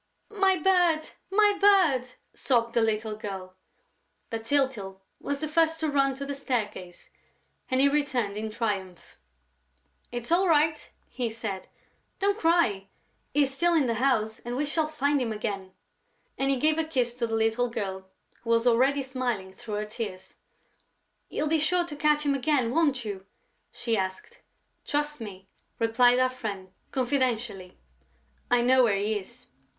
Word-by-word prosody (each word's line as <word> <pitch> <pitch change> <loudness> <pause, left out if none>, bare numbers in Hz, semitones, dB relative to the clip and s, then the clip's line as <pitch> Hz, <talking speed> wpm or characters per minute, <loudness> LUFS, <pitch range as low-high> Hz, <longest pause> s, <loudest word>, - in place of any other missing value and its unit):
"My 385 -2 +3
bird! 345 -2 +2 0.2
My 415 +1 +4
bird!" 320 -12 +4 0.2
sobbed 235 -3 +1
the 235 - +3
little 220 -1 0
girl. 190 -3 -7 0.8
But 225 0 -4
Tyltyl 230 -8 0 0.2
was 285 0 -3
the 310 - -1
first 325 +1 +2
to 310 -2 0
run 275 -1 +2
to 280 +1 -5
the 280 - -4
staircase 215 -10 -4 0.6
and 255 - +1
he 275 - +6
returned 265 -8 0
in 220 +1 -3
triumph: 200 -5 -4 0.9
"It's 240 +3 -5
all 370 +3 +4
right!" 310 -1 +2 0.2
he 245 -3 -3
said. 220 -4 -5 0.5
"Don't 405 +2 +1
cry! 325 - +2 0.4
He 290 +1 +3
is 270 -1 0
still 345 +5 +2
in 305 -4 +3
the 235 - +1
house 220 -5 +1
and 240 +1 -5
we 290 +3 0
shall 310 +1 0
find 290 -2 0
him 235 -3 -1
again." 200 -3 -4 0.6
And 270 0 0
he 275 - +2
gave 310 +4 +2
a - - +2
kiss 255 -7 0
to 240 -1 -2
the 225 - -2
little 225 +2 +1
girl, 190 -4 -5 0.3
who 230 - -8
was 230 0 +3
already 260 +4 +3
smiling 245 -8 -3
through 210 +2 -7
her 210 +1 -2
tears: 210 -4 -6 1.0
"You'll 305 - -2
be 315 +1 +2
sure 350 +3 +2
to 315 -4 -7
catch 300 0 +2
him 285 - +2
again, 275 -3 +1
won't 275 -5 +1
you?" 195 -2 -6 0.4
she 235 -2 -2
asked. 190 - -5 0.4
"Trust 295 -2 -2
me," 195 -3 -9 0.3
replied 245 +2 +4
our 255 0 +4
friend, 205 -7 -6 0.2
confidentially. 240 -7 -1 0.7
"I 245 -1 +4
now 255 +2 +4
know 255 - +7
where 210 -4 +2
he 210 +1 0
is." 240 +6 -13
250 Hz, 165 wpm, -27 LUFS, 215-295 Hz, 1.0 s, know